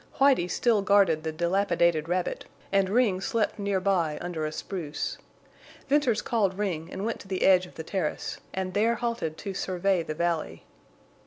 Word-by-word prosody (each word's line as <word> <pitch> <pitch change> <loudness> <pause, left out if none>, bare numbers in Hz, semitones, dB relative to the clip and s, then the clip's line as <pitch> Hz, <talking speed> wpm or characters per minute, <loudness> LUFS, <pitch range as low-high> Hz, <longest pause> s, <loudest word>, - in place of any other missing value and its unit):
Whitie 270 -10 +4
still 220 +2 +2
guarded 195 -6 +4
the 160 0 -3
dilapidated 170 -1 +1
rabbit, 180 0 -1 0.3
and 195 -1 +2
Ring 205 -4 +2
slept 220 +1 -1
near 200 -1 0
by 180 -6 +1
under 165 -3 -3
a - - -4
spruce. 155 -3 -4 0.7
Venters 275 -6 +2
called 200 -5 0
Ring 175 -6 -2
and 195 +2 -4
went 230 - -2
to - - -12
the 190 -1 -2
edge 185 -1 +5
of - - -18
the 160 - -6
terrace, 180 -3 -3
and 185 -1 -3
there 225 +4 +2
halted 235 -11 -3
to 195 - -5
survey 185 0 0
the 155 -1 -5
valley. 165 - -2
190 Hz, 170 wpm, -27 LUFS, 170-205 Hz, 0.7 s, edge